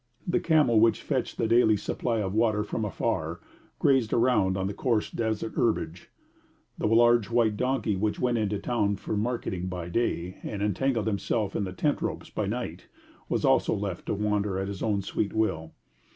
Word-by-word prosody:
The 175 - +1
camel, 150 -9 +4
which 115 +1 +3
fetched - - -2
the 115 - +1
daily 110 -2 +4
supply 115 +2 -2
of 95 -2 -2
water 110 -1 +2
from 110 +1 -3
afar, 90 -6 -2 0.4
grazed 130 -5 +2
around 110 -6 +3
on 95 - -1
the 100 - -2
coarse 115 -1 0
desert 110 -1 -2
herbage; 85 -7 -1 0.7
the - - -1
large 120 -1 +4
white 115 -3 +2
donkey 125 -3 0
which 105 +2 -1
went 120 -2 +1
into 105 -1 0
the - - -6
town 105 -4 +1
for 110 - -4
marketing 105 -5 -2
by 90 -2 -5
day, 90 -4 -1
and 100 -2 -4
entangled 110 +3 0
himself 105 -1 -1
in 100 - 0
the 95 - -5
tent 145 +11 0
ropes - - -4
by 105 - -2
night, 100 -6 -4 0.4
was - - 0
also - - +3
left 100 -3 -4
to - - 0
wander 105 -1 0
at 95 +1 -2
his 100 -1 -6
own 105 -3 0
sweet 100 +1 -2
will. 80 -8 -1
105 Hz, 185 wpm, -27 LUFS, 100-115 Hz, 0.7 s, camel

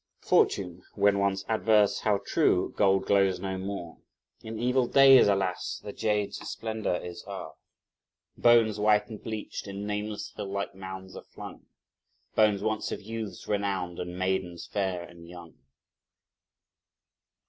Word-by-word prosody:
Fortune, 90 -2 +2
when 100 -1 +3
once 100 -1 0
adverse, 110 -2 +3
how 105 -2 +1
true! - - +2
gold 95 -1 +3
glows 95 -2 +3
no 95 -1 -4
more! 95 -3 -6 0.4
In 110 0 -7
evil 125 +2 +1
days, 135 -2 +7
alas! 95 -4 -1
the - - -7
jade's 105 -2 -1
splendour 110 -4 -2
is 90 0 -7
o'er! - - -6 0.8
Bones, 115 -3 +4
white 105 +1 +3
and 110 -2 -8
bleached, 110 -2 -6
in 100 +1 -5
nameless 105 0 -4
hill - - -5
like 100 0 -3
mounds 95 0 -9
are - - -7
flung, - - -11 0.7
Bones 105 -2 +3
once 110 0 -1
of - - -3
youths 110 -1 -6
renowned 95 -4 -2
and 90 0 -5
maidens 95 -2 -2
fair 95 -4 -2
and 85 -1 -13
young. 85 -2 -12
100 Hz, 135 wpm, -28 LUFS, 95-110 Hz, 0.8 s, days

